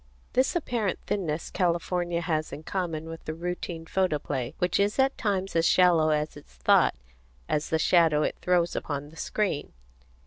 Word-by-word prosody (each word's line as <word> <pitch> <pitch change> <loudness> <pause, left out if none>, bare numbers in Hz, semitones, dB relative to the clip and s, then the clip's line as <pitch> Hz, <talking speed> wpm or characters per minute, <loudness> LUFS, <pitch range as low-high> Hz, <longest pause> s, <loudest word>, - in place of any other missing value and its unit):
This 260 +5 +2
apparent 235 - -1
thinness 165 -6 -2
California 175 -1 0
has 155 -2 -1
in 150 - -7
common 165 -3 -3
with 165 0 -8
the 155 - -4
routine 170 -1 -4
photoplay, 150 -9 -1
which 180 +1 +1
is 200 +1 +1
at 270 0 +3
times 195 -4 -1
as 165 0 +4
shallow 175 -4 +5
in 150 -1 +3
its 145 - -13
thought 60 0 +4 0.5
as 150 0 -1
the 160 - +2
shadow 160 -2 +4
it - - -1
throws 175 -1 +2
upon 145 -1 -4
the 160 - -16
screen. 190 -3 -2
170 Hz, 165 wpm, -27 LUFS, 155-185 Hz, 0.5 s, shallow